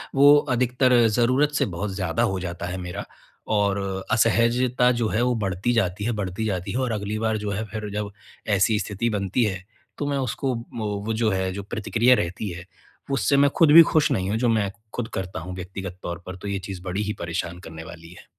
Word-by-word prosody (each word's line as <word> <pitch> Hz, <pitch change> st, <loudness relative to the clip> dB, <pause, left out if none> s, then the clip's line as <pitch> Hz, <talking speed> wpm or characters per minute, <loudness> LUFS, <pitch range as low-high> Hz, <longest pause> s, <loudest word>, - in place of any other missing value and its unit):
वो 145 Hz, +2 st, +8 dB, 0.2 s
अधिकतर 125 Hz, +1 st, +3 dB
ज़रूरत 130 Hz, +7 st, +2 dB
से -, -, +2 dB
बहुत 95 Hz, +2 st, -4 dB
ज़्यादा 95 Hz, +4 st, 0 dB
हो 95 Hz, -5 st, 0 dB
जाता 85 Hz, -1 st, -5 dB
है 90 Hz, +1 st, -4 dB
मेरा 90 Hz, -1 st, -5 dB, 0.5 s
और 100 Hz, -1 st, +2 dB, 0.3 s
असहजता 120 Hz, +2 st, +3 dB
जो 110 Hz, -, +2 dB
है 115 Hz, -, 0 dB
वो 125 Hz, -1 st, +2 dB
बढ़ती 100 Hz, +2 st, -1 dB
जाती 100 Hz, -3 st, 0 dB
है, 120 Hz, -, +1 dB
बढ़ती 105 Hz, 0 st, -3 dB
जाती 95 Hz, -4 st, -2 dB
है 125 Hz, -, -2 dB
और 125 Hz, -3 st, 0 dB
अगली 105 Hz, +1 st, -3 dB
बार 110 Hz, -1 st, 0 dB
जो 105 Hz, -1 st, -3 dB
है 105 Hz, +3 st, -2 dB
फिर 105 Hz, 0 st, -6 dB
जब 105 Hz, -1 st, -3 dB, 0.5 s
ऐसी 105 Hz, +2 st, +3 dB
स्थिति 105 Hz, +3 st, -2 dB
बनती 100 Hz, +4 st, 0 dB
है, 95 Hz, -2 st, -3 dB, 0.3 s
तो 145 Hz, -, -2 dB
मैं 140 Hz, -, 0 dB
उसको 130 Hz, 0 st, -1 dB, 0.2 s
वो 110 Hz, -2 st, -2 dB, 0.2 s
वो 110 Hz, -, 0 dB
जो 110 Hz, 0 st, +1 dB
है 95 Hz, 0 st, 0 dB
जो 100 Hz, 0 st, -5 dB
प्रतिक्रिया 115 Hz, +4 st, +2 dB
रहती 90 Hz, +3 st, -3 dB
है, 90 Hz, 0 st, -8 dB, 0.5 s
उससे 135 Hz, +2 st, +2 dB
मैं 140 Hz, 0 st, +5 dB
खुद 160 Hz, -3 st, +6 dB
भी 165 Hz, -, +12 dB
खुश 155 Hz, -2 st, +3 dB
नहीं 95 Hz, 0 st, 0 dB
हूँ, 110 Hz, -, 0 dB
जो 120 Hz, 0 st, +1 dB
मैं 105 Hz, -3 st, +2 dB, 0.2 s
खुद 120 Hz, -2 st, -3 dB
करता 95 Hz, -2 st, -4 dB
हूँ 90 Hz, +2 st, -7 dB
व्यक्तिगत 95 Hz, 0 st, -7 dB
तौर 85 Hz, 0 st, -5 dB
पर, 95 Hz, -, -6 dB
तो 100 Hz, -, -8 dB
ये 100 Hz, -1 st, -2 dB
चीज़ 95 Hz, -2 st, -7 dB
बड़ी 95 Hz, +3 st, -2 dB
ही 105 Hz, 0 st, -2 dB
परेशान 85 Hz, +1 st, -4 dB
करने 80 Hz, -3 st, -9 dB
वाली 85 Hz, 0 st, -11 dB
है। -, -, -16 dB
105 Hz, 220 wpm, -24 LUFS, 95-120 Hz, 0.5 s, भी